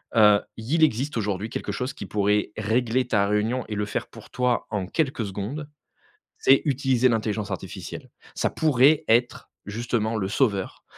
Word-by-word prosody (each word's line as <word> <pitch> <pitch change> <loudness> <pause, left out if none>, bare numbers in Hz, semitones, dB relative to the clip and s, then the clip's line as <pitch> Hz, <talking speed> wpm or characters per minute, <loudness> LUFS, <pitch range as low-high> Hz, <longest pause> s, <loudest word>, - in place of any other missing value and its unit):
Heu, 105 -2 +6 0.2
il 140 +9 0
existe 140 -1 +1
aujourd'hui 105 0 -2
quelque - - -4
chose 125 +2 -3
qui 100 - -8
pourrait 105 +1 +1
régler 115 +3 +1
ta 100 -2 +2
réunion 110 +5 0
et 105 - -4
le 105 0 -1
faire - - -3
pour - - -14
toi 125 -1 0
en 100 -4 -2
quelques 135 -4 -1
secondes, 110 +11 -5 0.7
c'est 135 0 +5
utiliser 130 -3 +2
l'intelligence 110 -2 -1
artificielle. 95 - -7 0.3
Ça - - 0
pourrait 145 0 +4
être 120 +2 +1 0.2
justement 115 +1 -2
le 95 - -1
sauveur, 105 -5 0
115 Hz, 160 wpm, -25 LUFS, 105-130 Hz, 0.7 s, Heu